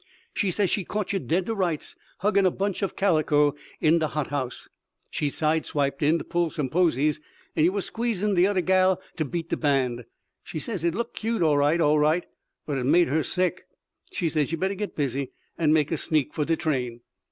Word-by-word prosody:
She 200 Hz, -, 0 dB
says 190 Hz, +1 st, +1 dB
she 200 Hz, -, 0 dB
caught 205 Hz, +2 st, -3 dB
yer 195 Hz, -, +1 dB
dead 175 Hz, +1 st, 0 dB
to 225 Hz, -, -2 dB
rights, 180 Hz, -7 st, -2 dB, 0.3 s
huggin' 200 Hz, 0 st, +3 dB
a 185 Hz, -, +5 dB
bunch 195 Hz, +2 st, -2 dB
o' 195 Hz, -, +2 dB
calico 155 Hz, -6 st, +2 dB, 0.3 s
in 160 Hz, +1 st, +4 dB
de 155 Hz, -, +1 dB
hot 150 Hz, -2 st, -3 dB
house. 130 Hz, -4 st, -3 dB, 0.4 s
She 145 Hz, -, -1 dB
side 155 Hz, +2 st, 0 dB
stepped 140 Hz, -2 st, -1 dB
in 155 Hz, +3 st, +3 dB
to -, -, -5 dB
pull 170 Hz, -1 st, 0 dB
some 145 Hz, -4 st, -3 dB
posies 155 Hz, -2 st, +2 dB, 0.4 s
and 155 Hz, -, +3 dB
yer -, -, +2 dB
was 200 Hz, -1 st, -2 dB
squeezin' 215 Hz, -3 st, -1 dB
de 180 Hz, 0 st, +4 dB
oder 200 Hz, -2 st, +1 dB
gal 185 Hz, +1 st, +3 dB, 0.2 s
to 155 Hz, -, 0 dB
beat 165 Hz, +4 st, -4 dB
de -, -, -1 dB
band. 130 Hz, -5 st, 0 dB, 0.4 s
She -, -, -7 dB
says 180 Hz, +2 st, -3 dB
it 170 Hz, 0 st, +1 dB
looked 235 Hz, +3 st, -4 dB
cute, 225 Hz, -4 st, 0 dB
all 150 Hz, -3 st, +3 dB
right 150 Hz, +4 st, +3 dB
all 150 Hz, -1 st, +4 dB
right, 155 Hz, +4 st, +2 dB, 0.4 s
but 140 Hz, -3 st, -2 dB
it 125 Hz, -, -2 dB
made 165 Hz, +3 st, +4 dB
her 155 Hz, +4 st, +2 dB
sick. 185 Hz, +3 st, -1 dB, 0.4 s
She 175 Hz, -, -1 dB
says 155 Hz, -2 st, 0 dB
yer 165 Hz, -, -1 dB
better 190 Hz, +3 st, 0 dB
git 205 Hz, +1 st, -5 dB
busy, 140 Hz, -2 st, -2 dB, 0.2 s
and 155 Hz, -3 st, +2 dB
make 155 Hz, -1 st, +2 dB
a 165 Hz, -, 0 dB
sneak 150 Hz, -1 st, 0 dB
for 150 Hz, -, -1 dB
de 165 Hz, -, +2 dB
train." 130 Hz, -8 st, -2 dB
160 Hz, 220 wpm, -26 LUFS, 150-185 Hz, 0.4 s, a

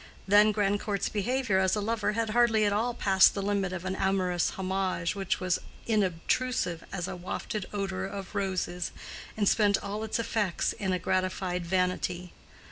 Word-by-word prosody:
Then 205 Hz, +2 st, +6 dB
Grandcourt's 205 Hz, -1 st, 0 dB
behavior 220 Hz, -1 st, 0 dB
as 190 Hz, +1 st, +2 dB
a -, -, -1 dB
lover 215 Hz, 0 st, 0 dB
had 225 Hz, 0 st, -1 dB
hardly 225 Hz, -2 st, +4 dB
at 205 Hz, -, +2 dB
all 235 Hz, +3 st, 0 dB
passed 190 Hz, -4 st, +5 dB
the 200 Hz, -, -1 dB
limit 200 Hz, -2 st, 0 dB
of 185 Hz, -1 st, -5 dB
an 190 Hz, 0 st, -2 dB
amorous 185 Hz, -3 st, +1 dB
homage 190 Hz, -3 st, -1 dB
which 195 Hz, -2 st, -1 dB
was 185 Hz, -2 st, 0 dB, 0.3 s
inobtrusive 195 Hz, -1 st, 0 dB
as 180 Hz, -2 st, -3 dB
a -, -, -5 dB
wafted 185 Hz, +3 st, -4 dB
odor 190 Hz, -2 st, -2 dB
of 195 Hz, -1 st, -7 dB
roses, 185 Hz, -3 st, -2 dB, 0.5 s
and 205 Hz, -2 st, +1 dB
spent 205 Hz, -1 st, +4 dB
all 205 Hz, +2 st, -4 dB
its 220 Hz, -, -1 dB
effects 215 Hz, -5 st, 0 dB
in 190 Hz, -2 st, -2 dB
a 185 Hz, -, +1 dB
gratified 185 Hz, -1 st, -1 dB
vanity. 180 Hz, -1 st, -1 dB
195 Hz, 165 wpm, -29 LUFS, 185-210 Hz, 0.5 s, Then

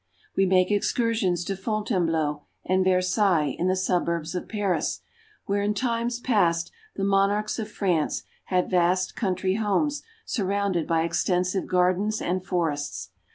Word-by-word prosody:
We 195 Hz, 0 st, +3 dB
make 185 Hz, +1 st, +3 dB
excursions 205 Hz, -4 st, +1 dB
to 195 Hz, -, -2 dB
Fontainebleau 180 Hz, -8 st, -1 dB, 0.2 s
and 185 Hz, 0 st, +2 dB
Versailles 185 Hz, -3 st, +2 dB
in 180 Hz, -, +1 dB
the 185 Hz, -, +2 dB
suburbs 170 Hz, -3 st, -1 dB
of 180 Hz, -, -4 dB
Paris, 195 Hz, -7 st, -1 dB, 0.5 s
where 200 Hz, 0 st, 0 dB
in 205 Hz, +1 st, 0 dB
times 235 Hz, +1 st, -1 dB
past 175 Hz, -9 st, +1 dB, 0.2 s
the 195 Hz, -, -3 dB
monarchs 200 Hz, +2 st, +1 dB
of 215 Hz, -1 st, -4 dB
France 180 Hz, -7 st, 0 dB, 0.2 s
had 180 Hz, -1 st, +1 dB
vast 180 Hz, +1 st, +2 dB
country 190 Hz, -2 st, 0 dB
homes 250 Hz, +8 st, 0 dB, 0.2 s
surrounded 200 Hz, -5 st, -1 dB
by 165 Hz, -1 st, +2 dB
extensive 180 Hz, +2 st, 0 dB
gardens 185 Hz, +4 st, +1 dB
and 185 Hz, +1 st, -1 dB
forests. 145 Hz, -, -2 dB
185 Hz, 135 wpm, -25 LUFS, 175-205 Hz, 0.5 s, We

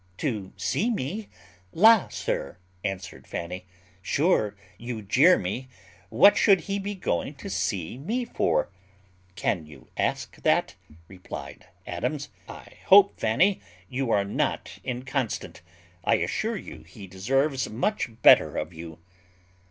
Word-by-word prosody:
"To 105 Hz, -10 st, -3 dB
see 225 Hz, -, 0 dB
me! 205 Hz, -, -3 dB, 0.4 s
La, 220 Hz, +3 st, +6 dB
sir," 70 Hz, -, -3 dB, 0.3 s
answered 95 Hz, -3 st, -5 dB
Fanny, 90 Hz, +2 st, -6 dB, 0.3 s
"sure 125 Hz, -, +1 dB, 0.2 s
you 120 Hz, -2 st, -5 dB
jeer 140 Hz, -, +5 dB
me; 110 Hz, +9 st, -4 dB, 0.4 s
what 205 Hz, -, +6 dB
should 195 Hz, -3 st, +5 dB
he 200 Hz, 0 st, -3 dB
be 200 Hz, +1 st, -4 dB
going 145 Hz, -, -2 dB
to 135 Hz, -, -8 dB
see 90 Hz, +3 st, -2 dB
me 230 Hz, -, -2 dB
for?" -, -, 0 dB, 0.6 s
"Can 80 Hz, -5 st, -1 dB
you 70 Hz, -5 st, -15 dB
ask -, -, -2 dB
that?" -, -, +2 dB, 0.3 s
replied 90 Hz, 0 st, -9 dB, 0.2 s
Adams. -, -, -3 dB, 0.2 s
"I -, -, -12 dB
hope, 200 Hz, 0 st, +6 dB
Fanny, 175 Hz, -, +2 dB, 0.3 s
you 130 Hz, -1 st, -2 dB
are 100 Hz, -3 st, +2 dB
not 100 Hz, -, -2 dB
inconstant; 130 Hz, -1 st, -3 dB, 0.4 s
I -, -, +3 dB
assure -, -, -1 dB
you 80 Hz, -, -9 dB
he 90 Hz, +5 st, -12 dB
deserves 130 Hz, +9 st, 0 dB
much 130 Hz, -, -1 dB
better -, -, +7 dB
of -, -, -3 dB
you." 80 Hz, -1 st, -9 dB
125 Hz, 130 wpm, -26 LUFS, -, 0.6 s, better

